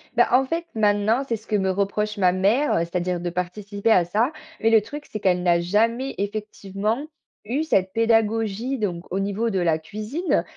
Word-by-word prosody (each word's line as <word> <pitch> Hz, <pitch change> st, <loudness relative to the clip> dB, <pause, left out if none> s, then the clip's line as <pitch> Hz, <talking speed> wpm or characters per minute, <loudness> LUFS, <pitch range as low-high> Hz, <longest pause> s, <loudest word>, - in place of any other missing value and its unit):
Bah 240 Hz, -, +4 dB
en 260 Hz, +2 st, +4 dB
fait, 335 Hz, +4 st, -2 dB
maintenant, 215 Hz, +4 st, +2 dB
c'est 230 Hz, -, 0 dB
ce 220 Hz, 0 st, -12 dB
que 215 Hz, -, 0 dB
me 190 Hz, -1 st, +1 dB
reproche 210 Hz, +2 st, -1 dB
ma 180 Hz, -2 st, +4 dB
mère, 205 Hz, +10 st, +2 dB
heu, -, -, +2 dB
c'est-à-dire 175 Hz, +1 st, -1 dB
de 175 Hz, 0 st, -3 dB
participer 200 Hz, +4 st, -2 dB
à 180 Hz, -5 st, +5 dB
ça. 220 Hz, -, +1 dB, 0.3 s
Mais 225 Hz, -, +4 dB
le 225 Hz, -1 st, +6 dB
truc 290 Hz, +7 st, -8 dB
c'est 215 Hz, -, -4 dB
qu'elle 180 Hz, -2 st, +1 dB
n'a 170 Hz, -1 st, +3 dB
jamais, 230 Hz, +9 st, 0 dB
effectivement, 210 Hz, +4 st, -3 dB, 0.4 s
eu 265 Hz, +8 st, -1 dB
cette 190 Hz, -11 st, +1 dB
pédagogie, 225 Hz, +2 st, +1 dB
donc 180 Hz, -5 st, -3 dB
au 190 Hz, -, -1 dB
niveau 205 Hz, +4 st, -1 dB
de 190 Hz, -3 st, -1 dB
la 165 Hz, -2 st, +1 dB
cuisine, 215 Hz, -, -2 dB
210 Hz, 195 wpm, -23 LUFS, 185-230 Hz, 0.4 s, le